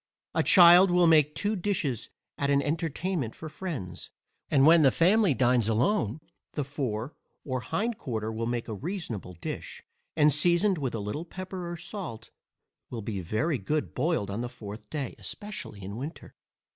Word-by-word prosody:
A -, -, +2 dB
child 180 Hz, +1 st, +8 dB
will 175 Hz, 0 st, +4 dB
make 155 Hz, -2 st, +5 dB
two 210 Hz, +6 st, 0 dB
dishes 170 Hz, -, -1 dB, 0.3 s
at 140 Hz, -, -1 dB
an 140 Hz, 0 st, +4 dB
entertainment 160 Hz, -, -2 dB
for 160 Hz, -, -8 dB
friends, 150 Hz, -, -6 dB, 0.4 s
and 135 Hz, -1 st, +4 dB
when 165 Hz, +1 st, +7 dB
the 140 Hz, -, +6 dB
family 185 Hz, -, +3 dB
dines 120 Hz, -2 st, +3 dB
alone, 115 Hz, -, +1 dB, 0.4 s
the 145 Hz, -, -1 dB
fore 130 Hz, -3 st, -3 dB, 0.3 s
or 130 Hz, -2 st, -2 dB
hind 205 Hz, -, -2 dB
quarter 110 Hz, -5 st, -3 dB
will 115 Hz, +1 st, -3 dB
make 120 Hz, -1 st, -2 dB
a 110 Hz, -, -4 dB
reasonable 125 Hz, -, -5 dB
dish, 85 Hz, -, -6 dB, 0.3 s
and 150 Hz, -2 st, +5 dB
seasoned 175 Hz, +4 st, +3 dB
with 130 Hz, -5 st, -2 dB
a -, -, -2 dB
little 105 Hz, +10 st, -4 dB
pepper 185 Hz, 0 st, -6 dB
or 175 Hz, -, -5 dB
salt, 170 Hz, -, -7 dB, 0.6 s
will 115 Hz, -3 st, -5 dB
be 100 Hz, -2 st, -3 dB
very 120 Hz, -, -1 dB
good 150 Hz, +10 st, -2 dB
boiled 130 Hz, -, 0 dB
on 105 Hz, +4 st, -3 dB
the 120 Hz, -, -3 dB
fourth 105 Hz, -3 st, -10 dB
day, 145 Hz, -5 st, -3 dB
especially 105 Hz, -, -6 dB
in 100 Hz, +3 st, -6 dB
winter. 140 Hz, +6 st, -7 dB
145 Hz, 170 wpm, -28 LUFS, 115-175 Hz, 0.6 s, child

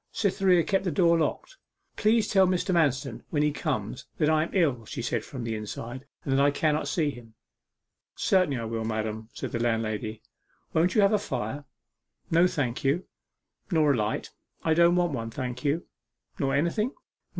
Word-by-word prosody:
Cytherea 190 Hz, -4 st, +3 dB
kept 195 Hz, +2 st, +1 dB
the 185 Hz, -, 0 dB
door 170 Hz, -2 st, +3 dB
locked. -, -, -2 dB, 0.4 s
'Please 220 Hz, +1 st, +3 dB
tell 190 Hz, -2 st, +4 dB
Mr. 185 Hz, +1 st, 0 dB
Manston 135 Hz, -7 st, +1 dB
when 150 Hz, -2 st, +1 dB
he 150 Hz, -, +2 dB
comes 135 Hz, -, -3 dB
that 155 Hz, -1 st, +3 dB
I 155 Hz, -1 st, +3 dB
am 160 Hz, -, -2 dB
ill,' 145 Hz, -, +1 dB
she 115 Hz, -, -6 dB
said 120 Hz, -2 st, -1 dB
from 125 Hz, -1 st, -7 dB
the 115 Hz, -1 st, -2 dB
inside, 115 Hz, +5 st, -6 dB, 0.2 s
'and 135 Hz, -, 0 dB
that 135 Hz, +1 st, +4 dB
I 145 Hz, -, +5 dB
cannot 150 Hz, 0 st, 0 dB
see 145 Hz, 0 st, +1 dB
him.' 115 Hz, -4 st, -13 dB, 0.8 s
'Certainly 185 Hz, -8 st, +2 dB
I 115 Hz, -, -4 dB
will, 115 Hz, 0 st, -3 dB
madam,' 110 Hz, 0 st, -3 dB
said -, -, -6 dB
the 120 Hz, -, -2 dB
landlady. 110 Hz, -1 st, -1 dB, 0.5 s
'Won't 170 Hz, +3 st, +2 dB
you 215 Hz, -, +5 dB
have 200 Hz, +1 st, +4 dB
a 210 Hz, -, +3 dB
fire?' 135 Hz, -, -4 dB, 0.7 s
'No, 170 Hz, +2 st, +5 dB
thank 130 Hz, -8 st, -2 dB
you.' 145 Hz, +7 st, +1 dB, 0.6 s
'Nor 155 Hz, -5 st, +3 dB
a -, -, +1 dB
light?' 105 Hz, -2 st, -2 dB, 0.3 s
'I 160 Hz, -, +3 dB
don't 170 Hz, +1 st, +5 dB
want 175 Hz, -2 st, +2 dB
one, 115 Hz, -3 st, -3 dB
thank 125 Hz, +1 st, -5 dB
you.' 150 Hz, +4 st, 0 dB, 0.5 s
'Nor 135 Hz, -1 st, +1 dB
anything? 170 Hz, -, 0 dB
145 Hz, 185 wpm, -27 LUFS, 115-175 Hz, 0.8 s, I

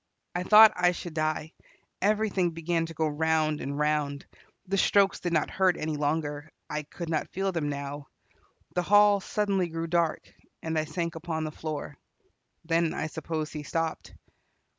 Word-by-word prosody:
I 180 Hz, -, -1 dB
thought 215 Hz, +3 st, +8 dB
I 180 Hz, 0 st, +3 dB
should 175 Hz, -1 st, -7 dB
die; 155 Hz, 0 st, -2 dB, 0.5 s
everything 205 Hz, -3 st, +2 dB
began 165 Hz, 0 st, -1 dB
to 165 Hz, -, -8 dB
go 160 Hz, +1 st, +1 dB
round 155 Hz, 0 st, +1 dB
and 140 Hz, +1 st, -4 dB
round. 150 Hz, -1 st, 0 dB, 0.4 s
The 195 Hz, +1 st, -1 dB
strokes 200 Hz, 0 st, +3 dB
did 175 Hz, -, -3 dB
not 160 Hz, -3 st, +1 dB
hurt 185 Hz, -2 st, +2 dB
any 155 Hz, 0 st, -2 dB
longer; 145 Hz, 0 st, -2 dB, 0.2 s
I 150 Hz, -, -3 dB
could 165 Hz, +3 st, -8 dB
not 160 Hz, -1 st, -1 dB
feel 195 Hz, +1 st, -1 dB
them 160 Hz, -5 st, -2 dB
now. 140 Hz, 0 st, -5 dB, 0.7 s
The 180 Hz, -, +1 dB
hall 205 Hz, +2 st, +5 dB
suddenly 195 Hz, -3 st, 0 dB
grew 165 Hz, 0 st, -3 dB
dark, 165 Hz, -1 st, -1 dB, 0.3 s
and 160 Hz, 0 st, -2 dB
I 155 Hz, 0 st, +1 dB
sank 170 Hz, +2 st, -3 dB
upon 165 Hz, -1 st, -4 dB
the 155 Hz, -, -3 dB
floor. 150 Hz, -2 st, -6 dB, 0.7 s
Then 165 Hz, 0 st, +1 dB
I -, -, -2 dB
suppose 155 Hz, 0 st, -4 dB
he 150 Hz, -, -5 dB
stopped. 165 Hz, +2 st, -3 dB
160 Hz, 165 wpm, -28 LUFS, 155-180 Hz, 0.7 s, thought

